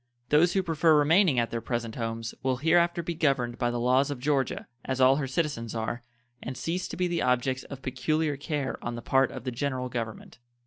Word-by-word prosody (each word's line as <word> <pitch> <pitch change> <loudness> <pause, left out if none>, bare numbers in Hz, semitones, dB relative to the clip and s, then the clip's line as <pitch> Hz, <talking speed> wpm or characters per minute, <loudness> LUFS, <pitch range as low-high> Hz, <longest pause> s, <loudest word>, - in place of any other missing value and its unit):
Those 160 +4 +4
who 190 - +2
prefer 160 -2 +3
remaining 160 0 +4
at 115 -1 +1
their 115 - -2
present 115 -2 -3
homes 115 -1 -4
will 130 -1 0
hereafter 170 +4 +2
be 170 - -3
governed 135 -7 0
by 120 - +1
the 120 0 -2
laws 130 +4 +3
of 145 - -3
Georgia, 140 -1 0 0.2
as 130 0 -3
all 130 +1 +6
her 140 -3 -2
citizens 130 -6 -2
are, 115 +2 -3 0.4
and 130 +1 -6
cease 175 +2 -2
to - - -7
be 180 0 +1
the 170 -1 -1
objects 125 +1 0
of 135 -1 -9
peculiar 150 +4 0
care 140 -1 -3
on 120 0 -3
the 120 - -7
part 135 0 +3
of 130 - -8
the 130 - -3
General 130 0 -2
Government. 115 -1 -6
135 Hz, 215 wpm, -28 LUFS, 120-155 Hz, 0.4 s, all